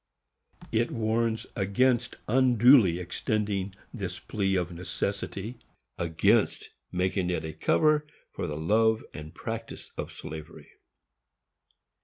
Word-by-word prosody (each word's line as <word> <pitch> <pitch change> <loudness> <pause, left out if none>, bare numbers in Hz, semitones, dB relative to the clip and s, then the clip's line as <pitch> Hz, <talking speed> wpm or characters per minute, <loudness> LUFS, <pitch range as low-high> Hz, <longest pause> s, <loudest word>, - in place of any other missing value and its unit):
It 115 +2 +2
warns 115 0 0
against 120 +5 +2
"unduly 120 -5 +6
extending 100 +2 -2 0.2
this - - -4
plea 95 -2 -1
of 90 -1 0
necessity," 100 +5 -4 0.4
against 80 -1 +2 0.2
making 90 0 0
it 85 -3 -1
a 80 - -5
cover 150 - +2 0.2
for - - -4
the 75 - -4
love 110 +7 +3
and 75 0 -8
practice 115 +6 -6
of - - -4
slavery. 80 -1 -9
100 Hz, 105 wpm, -28 LUFS, 90-115 Hz, 0.4 s, unduly